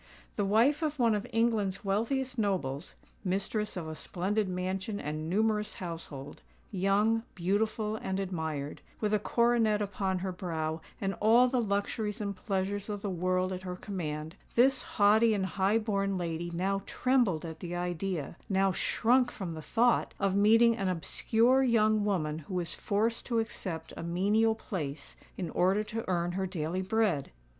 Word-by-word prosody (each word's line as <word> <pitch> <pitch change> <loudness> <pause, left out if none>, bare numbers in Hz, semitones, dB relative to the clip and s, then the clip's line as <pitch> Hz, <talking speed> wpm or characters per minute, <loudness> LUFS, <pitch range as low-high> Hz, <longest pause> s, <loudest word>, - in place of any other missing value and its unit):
The 205 - 0
wife 235 +10 +3
of 305 -2 -1
one 235 -4 +3
of 205 -1 -2
England's 220 -4 +1
wealthiest 250 +6 0
nobles,—mistress 195 +4 -2
of 165 -3 -4
a 160 - -4
splendid 190 +6 -1
mansion 185 +3 -2
and 155 +2 -4
numerous 210 +2 +1
household,—young, 185 +6 -2
beautiful, 210 +4 0
and 190 -2 -3
admired,—with 160 +3 -3
a 210 - +4
coronet 230 -1 +2
upon 195 -2 -1
her 190 - -1
brow, 165 -4 -3 0.2
and 195 -2 -1
all 230 +4 +6
the 250 -1 +1
luxuries 210 +1 -1
and 200 -2 -3
pleasures 200 +1 -2
of 205 -1 -4
the 200 - -1
world 185 +1 0
at 185 - -5
her 180 -1 -5
command,—this 185 - -1
haughty 215 +2 +4
and 195 -2 0
high 190 +4 +1
born 200 -3 0
lady 170 -1 -3
now 190 +3 -1
trembled 240 -11 +1
at 160 -1 -7
the 175 -1 -5
idea—now 180 +2 -1
shrunk 245 +6 +2
from 185 -7 -5
the 160 - -6
thought—of 225 -2 +1
meeting 225 +3 +5
an 195 -4 -2
obscure 225 +8 +2
young 215 -4 +3
woman 160 -7 0
who 165 +4 -7
was 170 -2 -1
forced 225 +3 -1
to 235 - 0
accept 185 -7 -3
a - - -6
menial 205 +6 +2
place 160 -10 -5 0.2
in 175 -5 -3
order 190 +4 +2
to 225 +1 -4
earn 175 -1 +1
her 190 +1 -2
daily 180 0 -2
bread! 190 -7 +1
195 Hz, 150 wpm, -30 LUFS, 180-220 Hz, 0.2 s, all